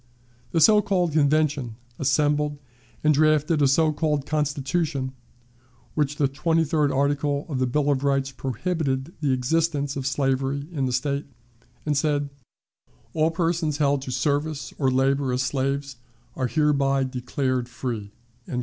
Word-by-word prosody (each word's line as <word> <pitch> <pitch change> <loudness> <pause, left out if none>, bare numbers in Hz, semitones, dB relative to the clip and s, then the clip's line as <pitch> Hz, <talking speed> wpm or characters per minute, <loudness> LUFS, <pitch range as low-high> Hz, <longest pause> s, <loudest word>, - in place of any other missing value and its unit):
The 165 - +1
so 210 +5 +6
called 180 -4 +1
Convention 145 -5 +1 0.2
assembled 145 +2 +1 0.5
and 155 0 +5
drafted 155 +1 +3
a 140 - +5
so 155 +3 +3
called 150 -2 0
Constitution, 150 0 -1
in 130 - -4 0.8
which 150 -1 0
the 145 -2 +2
twenty 160 +4 +1
third 150 -2 +1
article 145 +1 0
of 140 -6 -3
the 130 - +1
Bill 145 +3 +1
of 135 -1 0
Rights 135 -1 +1
prohibited 135 - -2
the 145 -3 +1
existence 145 +2 0
of 135 -1 -3
slavery 135 +1 0
in 140 -6 -1
the - - -2
State, 140 +3 -1 0.6
and 150 -1 +1
said, 145 -1 0 0.8
"All 160 0 +2
persons 165 -2 0
held 145 -2 +2
to 130 - -6
service 145 +4 -1
or 135 -3 +3
labor 135 +1 +1
as 125 +1 0
slaves 135 0 -2 0.4
are 130 - -1
hereby 140 -2 +2
declared 130 -1 -2
free." 115 -5 -5
140 Hz, 145 wpm, -24 LUFS, 135-155 Hz, 0.8 s, so